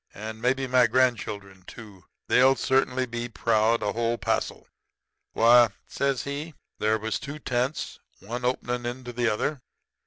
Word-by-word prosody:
And 110 +2 -7
maybe 130 +2 +1
my 125 -1 +4
grandchildren, 105 -6 0
too. 100 -6 -12 0.2
They'll 130 +1 +5
certainly 130 -1 +1
be 120 0 -5
proud 115 0 +1
a 105 - -1
whole 115 0 0
passel. - - -2 0.7
Why,' 120 +1 +6 0.2
says 140 -2 -1
he, 145 +2 -5 0.2
'there 110 +1 +2
was 110 0 -3
two 145 +1 -7
tents, 130 0 -2 0.2
one 120 +6 -6
openin' 125 -1 -1
into 125 0 -6
the 120 -1 +1
other. 130 +6 -2
120 Hz, 145 wpm, -26 LUFS, 110-130 Hz, 0.7 s, Why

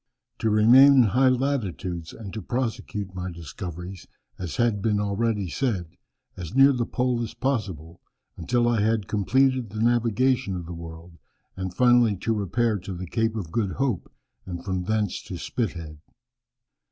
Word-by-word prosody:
To 110 - +1
remain 120 +7 +7
in 130 -2 +7
high 125 +5 +3
latitudes 100 - -2
and 100 -4 -9
to 110 - -5
prosecute 110 -3 -3
my 90 0 -4
discoveries, 90 +2 -8 0.3
as 90 -3 -4
had 120 -5 +1
been 105 -1 +1
already 105 0 0
said, 95 - -2 0.4
as 90 +4 -7
near 135 +1 +7
the 120 -2 -1
pole 125 -2 0
as 115 - -5
possible, 95 - -3 0.3
until 120 +8 0
I 115 -3 +2
had 110 -2 +1
completed 130 +3 +2
the 110 +2 -6
navigation 120 -1 +2
of 90 -1 -5
the 90 - -7
world, 85 0 -10 0.4
and 95 -1 -4
finally 120 +1 +4
to 115 +4 -1
repair 110 +1 0
to 95 +1 -7
the 90 +1 -5
Cape 115 +5 -1
of 95 -7 -5
Good 100 -1 -1
Hope, 125 -9 -2 0.3
and 85 -2 -7
from 95 -2 -2
thence 105 -2 -1
to 90 - -7
Spithead." 85 -8 -4
105 Hz, 160 wpm, -25 LUFS, 90-120 Hz, 0.4 s, remain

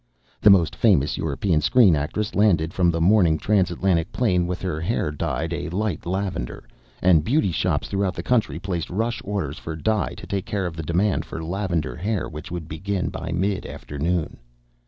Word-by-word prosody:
The 105 - +7
most 90 -5 +5
famous 90 -11 +3
European 80 +2 0
screen 100 - +5
actress 85 +9 -2
landed 85 -6 +2
from 90 -2 +3
the 85 -1 0
morning 85 -2 +4
Trans 95 0 +2
Atlantic 85 -1 0
plane 90 -8 +1
with 90 0 -3
her 80 -4 -2
hair 85 -4 -1
dyed 80 +2 -2
a 85 - -3
light 95 -2 -2
lavender, 95 -9 -3 0.4
and 85 -4 +5
beauty 120 - +2
shops - - 0
throughout 100 -2 -1
the - - -5
country 125 -3 +1
placed 90 -4 -3
rush 115 +5 -1
orders 95 -7 -3
for 80 - -6
dye 100 +3 -1
to - - -9
take 100 0 -3
care 100 -2 -1
of 85 -2 -4
the 80 - -4
demand 90 +6 +1
for 80 - -6
lavender 85 -2 -2
hair 100 +3 -2
which 75 0 -8
would 85 -3 -5
begin 95 +4 -2
by 80 - -5
mid 95 +3 0
afternoon. 80 +3 -3
90 Hz, 185 wpm, -23 LUFS, 80-100 Hz, 0.4 s, The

